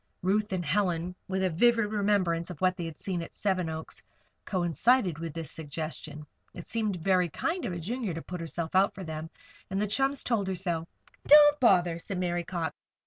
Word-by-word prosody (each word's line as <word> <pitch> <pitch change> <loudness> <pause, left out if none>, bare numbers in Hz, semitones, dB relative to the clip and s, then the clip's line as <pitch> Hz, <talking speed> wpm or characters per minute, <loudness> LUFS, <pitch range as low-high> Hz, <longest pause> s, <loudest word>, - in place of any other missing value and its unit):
Ruth 210 +3 +1
and 180 -2 -2
Helen, 175 +1 0
with 190 0 -1
a 185 - +1
vivid 230 +6 +4
remembrance 200 -5 +1
of 175 -5 -8
what 185 0 +2
they 175 -2 -4
had 165 -1 -7
seen 185 -3 -3
at 165 - -9
Seven 185 -4 0
Oaks, 160 0 -6 0.4
coincided 185 - +2
with 165 -1 -4
this 165 -2 -4
suggestion. 155 -1 -6 0.3
It 175 - -8
seemed 215 -4 -1
very 180 0 +2
kind 330 - -2
of 185 - -2
a - - -4
Junior 210 +1 -3
to 165 - -4
put 180 -1 -6
herself 165 0 -4
out 190 +2 +3
for 190 - -7
them, 160 -1 -6 0.4
and 195 0 -1
the 210 - +1
chums 270 +6 +1
told 220 -5 0
her 190 - -1
so. 165 -2 -2 0.4
"Don't 295 0 +8
bother," 175 -8 +4
said 190 +2 -5
Mary 175 -1 -1
Cox. 170 -1 -3
180 Hz, 195 wpm, -29 LUFS, 165-205 Hz, 0.4 s, Don't